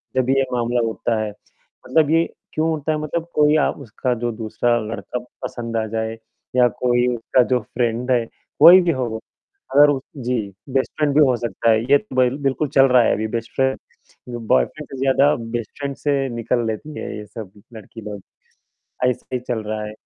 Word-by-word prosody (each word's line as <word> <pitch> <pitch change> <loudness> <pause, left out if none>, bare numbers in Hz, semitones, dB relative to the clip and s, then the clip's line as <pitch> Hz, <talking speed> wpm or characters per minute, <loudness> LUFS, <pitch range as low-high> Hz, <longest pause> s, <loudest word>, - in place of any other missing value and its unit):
जब 130 0 +1
ये 135 0 +3
मामला 120 0 0
होता 110 0 -1
है, 105 - -2
मतलब 150 +8 -3
ये 165 +1 +4 0.3
क्यों 160 +1 +1
होता 155 -1 -1
है 155 - 0
मतलब 165 +2 -3
कोई 150 0 +4
आ - - +3
उसका 125 -1 -3
जो 120 - 0
दूसरा 115 +2 0
लड़का 110 +3 -5 0.2
पसंद 115 -1 -4
आ 110 - 0
जाए 110 +1 -3 0.4
या 125 -1 +6
कोई 120 0 +2
उसका 120 +2 +2
जो 125 - +3
फ्रेंड 120 +1 -2
है, 120 -2 +2 0.3
कोई 175 +5 +10
भी 175 -1 +2
हो 130 -4 -1
वो। 110 0 -5 0.6
अगर 145 -1 +6 0.3
जी, 125 0 0 0.3
बेस्ट 130 0 0
फ्रेंड 150 -2 +1
भी - - +5
हो 125 - +2
सकता 115 0 0
ह। - - +5 0.2
ये 145 - +8
तो 215 -8 -11
ब 130 -1 +4
बिल्कुल 140 +2 0
चल 135 -1 +5
रहा 125 -1 +5
है - - +2
अभी 110 +1 -2
बेस्ट 115 0 -4
फ्रेंड, 130 0 +1 0.7
बॉयफ्रेंड 150 +4 +1
से 135 - -8
ज़्यादा 135 +2 +4 0.2
बेस्ट 115 -2 -4
फ्रेंड 140 -1 -3
से 140 -2 0
निकल 120 0 0
लेती 150 +8 -5
हैं, - - -5
ये 105 - -8
सब 105 -2 -9 0.2
लड़की 110 +1 -11
लोग। 105 -2 -7 0.8
ऐसा 125 -2 0
ही - - +1
चल 120 -2 -3
रहा 110 0 -3
है। 105 - -6
125 Hz, 195 wpm, -21 LUFS, 115-140 Hz, 0.8 s, कोई